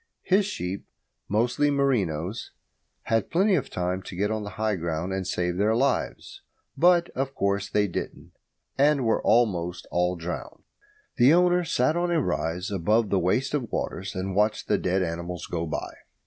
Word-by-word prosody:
His 195 +1 +3
sheep, 95 - -5 0.4
mostly 125 +7 +2
merinos, 110 - 0 0.5
had 115 -2 0
plenty 195 +4 +3
of 160 - 0
time 90 +1 -2
to 90 - -9
get 100 +4 0
on 110 0 -1
to 100 - -5
high 110 +2 -1
ground 85 +1 -3
and 95 -1 -3
save 90 0 -1
their 105 +3 +2
lives; 135 +2 -1 0.3
but, 175 0 +4
of 135 +1 -3
course, 100 0 0
they 105 -1 +2
didn't, 85 - -6 0.5
and 140 -2 +4
were 115 - +2
almost 90 -7 +1
all 90 +1 +1
drowned. 85 +1 -6 0.5
The 130 +5 +6
owner 180 0 +3
sat 150 -1 +1
on 175 0 0
a 170 -2 +2
rise 90 - -2
above 105 +3 +1
the 95 - +3
waste 120 +10 0
of 130 -7 -2
waters 95 +2 -3
and 95 0 -3
watched 105 +1 +1
the - - +2
dead 95 +1 +1
animals 85 0 -4
go 85 -1 -3
by. - - -4
105 Hz, 170 wpm, -26 LUFS, 90-135 Hz, 0.5 s, The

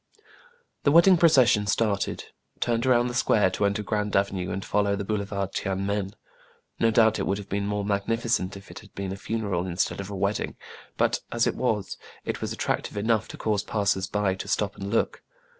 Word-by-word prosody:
The 140 - +3
wedding 170 +4 +7
procession 130 -11 +4
started, 105 -2 0 0.4
turned 120 +1 0
around 120 -1 +4
the 125 - -3
square 105 -5 +3
to 100 - 0
enter 100 +1 -2
Grand 105 0 -1
Avenue, 95 -2 0
and 95 +1 -4
follow 100 -1 +1
the 100 0 -4
boulevard 100 -2 -2
Tiene 95 0 -2
Men. 100 0 -2 0.6
No 115 - +4
doubt 110 -1 +4
it - - -1
would 100 - 0
have 100 -1 -9
been 100 0 -1
more 105 -1 -2
magnificent 100 -1 0
if 100 - -13
it - - -9
had - - -18
been 100 -1 -4
a - - -3
funeral 100 -3 -2
instead 90 +2 -1
of 100 - -8
a 100 - -5
wedding; 100 +2 -1 0.4
but, - - +2
as - - +2
it - - +1
was, - - -1 0.3
it - - -3
was - - -3
attrac - - -1
tive - - -8
enough 110 +1 +1
to - - -9
cause 105 -2 0
passers 100 -2 0
by 105 -2 0
to 95 - -7
stop 100 -2 0
and 100 0 -6
look. 115 - 0
100 Hz, 205 wpm, -26 LUFS, 100-110 Hz, 0.6 s, wedding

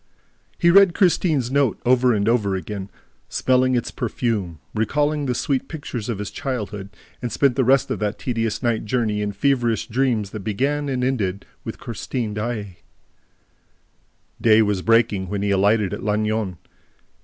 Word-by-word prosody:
He 170 - +4
read 195 -1 +6
Christine's 160 - +2
note 140 -5 +2
over 125 0 +4
and 105 -2 +1
over 105 -5 +2
again, 95 +1 -5 0.4
smelling 130 0 +2
its 120 - -1
perfume, 110 -8 -2 0.2
recalling 145 +6 0
the 125 - 0
sweet 135 +2 -1
pictures 130 -8 -6
of 115 - -2
his 105 0 -5
childhood, 105 -8 -4 0.3
and 120 -2 -3
spent 135 +2 +2
the 130 - +2
rest 130 +2 +3
of - - -2
that 105 0 -2
tedious 115 -2 -2
night 115 -2 0
journey 110 -2 0
in 105 0 -1
feverish 120 +1 +1
dreams 115 -4 0
that 110 - -5
began 140 +8 -1
and 130 -2 -1
ended 100 -7 -1 0.2
with - - -6
Christine 115 -1 -4
Daae. 105 -4 -4 1.6
Day 110 -1 +6
was 100 -3 0
breaking 110 -4 +2
when 100 0 -2
he 100 - +1
alighted 100 0 +2
at - - -5
Lannion. 105 -2 -1
115 Hz, 155 wpm, -22 LUFS, 105-130 Hz, 1.6 s, read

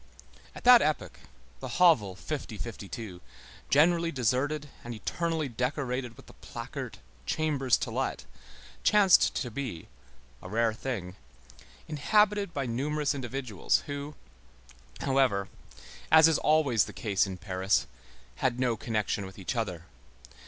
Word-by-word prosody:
At - - -10
that 245 -1 +9
epoch, 155 0 -1 0.4
the 125 -2 -5
hovel 125 - +4
50 125 0 -5
52 100 -4 -7 0.5
generally 165 +3 +4
deserted 140 +4 0 0.2
and 120 0 -6
eternally 165 +6 -2
decorated 125 -1 -3
with - - -14
the - - -15
placard: - - -7 0.3
"Chambers 145 -6 +1
to - - -4
let," - - -2 0.6
chanced 200 -3 +5
to 125 -4 -2
be, 115 -9 -5 0.5
a 90 - -9
rare 115 +2 +1
thing, 100 -7 -5 0.7
inhabited 205 +6 +2
by 140 -4 -3
numerous 145 +5 -1
individuals 125 -6 -1
who, 145 +1 -6 0.9
however, 130 -8 +2 0.6
as 160 0 +8
is 160 - +2
always 145 -8 +3
the - - -10
case 100 -3 0
in 95 -1 -6
Paris, 95 +1 0 0.5
had 125 -2 0
no 125 -3 +1
connection 105 -3 -2
with 95 - -13
each 95 +6 -4
other. 90 -8 -3
130 Hz, 125 wpm, -29 LUFS, 110-150 Hz, 0.9 s, that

